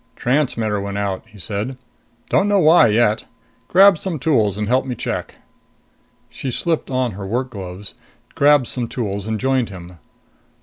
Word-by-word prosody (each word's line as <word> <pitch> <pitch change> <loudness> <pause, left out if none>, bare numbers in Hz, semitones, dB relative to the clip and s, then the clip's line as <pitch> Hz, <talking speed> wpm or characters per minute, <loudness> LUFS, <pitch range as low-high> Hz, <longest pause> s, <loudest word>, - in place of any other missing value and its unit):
"Transmitters 115 -6 0
went 100 0 -4
out," 100 -2 -2
he 105 -1 -17
said. 105 +7 -4 0.5
"Don't 195 - +3
know 205 0 +3
why 165 -6 +6
yet. 110 0 +2 0.4
Grab 195 -2 +6
some 185 -5 -3
tools 115 - +1
and 105 0 -2
help 130 +3 +2
me 130 -2 -4
check." - - -4 0.9
She 135 - -6
slipped 165 +6 -1
on 130 -2 0
her 100 0 -7
work 125 +5 -2
gloves, 95 -1 -7 0.4
grabbed 145 -2 +4
some 120 0 -4
tools 100 -4 -4
and 110 -1 -2
joined 130 -1 +1
him. 90 -2 -11
115 Hz, 160 wpm, -20 LUFS, 100-135 Hz, 0.9 s, why